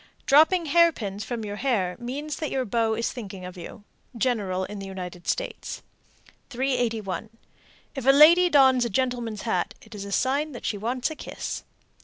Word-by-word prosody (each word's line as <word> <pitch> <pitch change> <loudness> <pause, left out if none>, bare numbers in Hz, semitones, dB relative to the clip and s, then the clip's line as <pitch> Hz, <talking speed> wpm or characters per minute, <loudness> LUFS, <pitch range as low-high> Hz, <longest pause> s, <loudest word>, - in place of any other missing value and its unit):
Dropping 320 +5 +5
hairpins 285 - +2
from 235 -3 -4
your 205 0 -5
hair 205 -9 0
means 285 +5 -5
that 310 - -3
your 260 -1 -1
beau 225 0 +1
is 230 +1 -2
thinking 195 -6 -8
of 180 0 -8
you. 185 +4 -10 0.3
General 205 -7 0
in 210 +1 -7
the 195 - -7
United 180 -2 -8
States. - - -3 0.7
381. 235 -7 -1 0.6
If 270 -3 -5
a - - +7
lady 330 +6 +7
dons 265 -5 +5
a 235 - -1
gentleman's 235 -2 -2
hat, 185 -6 -1
it 220 - -14
is 205 -2 -6
a 200 - -7
sign 280 +7 0
that 240 - -8
she - - -1
wants 245 +7 -2
a - - -6
kiss. - - -6
240 Hz, 175 wpm, -25 LUFS, 205-270 Hz, 0.7 s, a